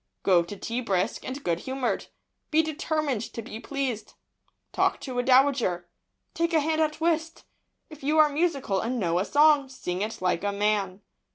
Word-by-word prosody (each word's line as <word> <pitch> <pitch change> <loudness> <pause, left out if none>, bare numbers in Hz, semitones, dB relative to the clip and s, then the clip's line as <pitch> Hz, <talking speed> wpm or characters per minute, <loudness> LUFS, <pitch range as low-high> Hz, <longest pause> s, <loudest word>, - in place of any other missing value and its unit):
Go 180 -3 +5
to 170 +4 -7
tea 235 +5 -3
brisk 195 -2 -1
and 265 +2 -6
good 170 -1 0
humoured. 260 +3 -2 0.4
Be 320 0 +3
determined 310 -5 -1
to 230 - -5
be 220 0 -8
pleased. 255 -5 -4 0.6
Talk - - +1
to 255 -3 -4
a - - +4
dowager. 255 -9 +3 0.5
Take 335 0 0
a - - +6
hand 315 +1 0
at 310 0 0
whist. 325 0 -1 0.4
If 310 -2 -13
you 300 +3 +1
are 310 -1 +7
musical, 285 - 0
and 240 +5 -2
know 175 -3 +1
a 190 - 0
song, 290 -1 +4
sing 185 -8 -4
it 215 +2 -3
like 180 -1 0
a 205 - 0
man. 200 -2 0
255 Hz, 180 wpm, -26 LUFS, 205-305 Hz, 0.6 s, are